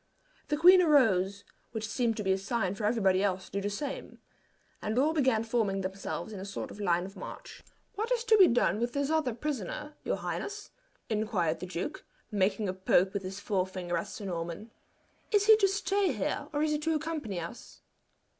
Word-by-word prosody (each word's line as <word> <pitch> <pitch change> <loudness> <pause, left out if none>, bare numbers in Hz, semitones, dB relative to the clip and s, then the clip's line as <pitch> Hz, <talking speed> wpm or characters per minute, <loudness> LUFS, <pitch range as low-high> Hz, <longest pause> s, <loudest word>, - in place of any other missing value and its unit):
The 295 0 0
queen 360 +4 +8
arose, 200 - +3 0.3
which 220 -1 -3
seemed 225 0 0
to 210 - -2
be 190 - +1
a 190 - +3
sign 195 -1 -1
for 205 +1 -4
everybody 195 -4 +3
else 185 -2 0
to - - -16
do 200 - -2
the 205 - -1
same, 275 +7 -5 0.6
and 215 +2 -2
all 295 +5 +3
began 260 -8 +2
forming 220 -4 0
themselves 195 +3 -4
in 200 - -6
a - - -6
sort 195 0 -5
of - - -11
line 175 -3 +1
of 195 +2 -10
march. - - -9 0.3
"What 445 +4 -3
is 480 -2 +1
to 445 -2 +5
be 375 - +9
done 235 -3 +2
with 240 +1 -1
this 280 +1 0
other 300 -7 +1
prisoner, 295 +1 -4
your - - 0
highness?" 415 +1 -5 0.4
inquired 210 -8 0
the 180 - -6
duke, 175 -1 -4 0.3
making 200 +1 +1
a 185 - -1
poke 190 0 +2
with 200 - -2
his 190 +1 -6
forefinger 185 -3 -2
at 170 - -2
Sir 210 - -8
Norman. 175 +4 -5 0.6
"Is 410 -2 +4
he 440 0 +9
to 400 -2 +4
stay 395 -1 +1
here, 210 -7 -2
or 295 0 0
is 310 - +1
he 300 - +1
to 320 +1 0
accompany 300 - -3
us?" 170 +8 -9
215 Hz, 200 wpm, -30 LUFS, 190-295 Hz, 0.6 s, be